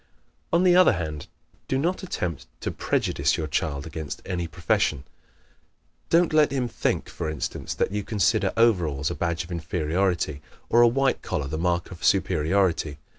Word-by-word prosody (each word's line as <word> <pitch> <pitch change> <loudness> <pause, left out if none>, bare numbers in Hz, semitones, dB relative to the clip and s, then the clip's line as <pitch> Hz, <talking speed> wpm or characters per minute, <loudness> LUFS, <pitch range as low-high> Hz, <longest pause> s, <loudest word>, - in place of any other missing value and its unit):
On 170 +2 +3
the 180 -1 +5
other 185 -7 +6
hand, 80 -5 -4 0.4
do 130 - 0
not 170 +7 0
attempt 90 - -4
to - - -2
prejudice - - 0
your 80 - -2
child 70 -1 -2
against 80 -2 -6
any 90 -3 -2
profession. 80 -5 0 1.1
Don't 170 -1 +3
let 155 -1 +5
him 130 -3 0
think, - - -1
for 80 - -4
instance, 75 -2 -4
that - - 0
you 105 0 -2
consider 105 +1 +1
overalls 85 -11 +2
a - - -1
badge 85 -1 -2
of 90 - -12
inferiority, 85 -1 -1 0.3
or 120 - +5
a 120 - +8
white 135 +3 +1
collar 75 - -2
the 80 +3 -4
mark 85 0 0
of 85 - -10
superiority. 90 -4 +1
90 Hz, 165 wpm, -25 LUFS, 80-115 Hz, 1.1 s, a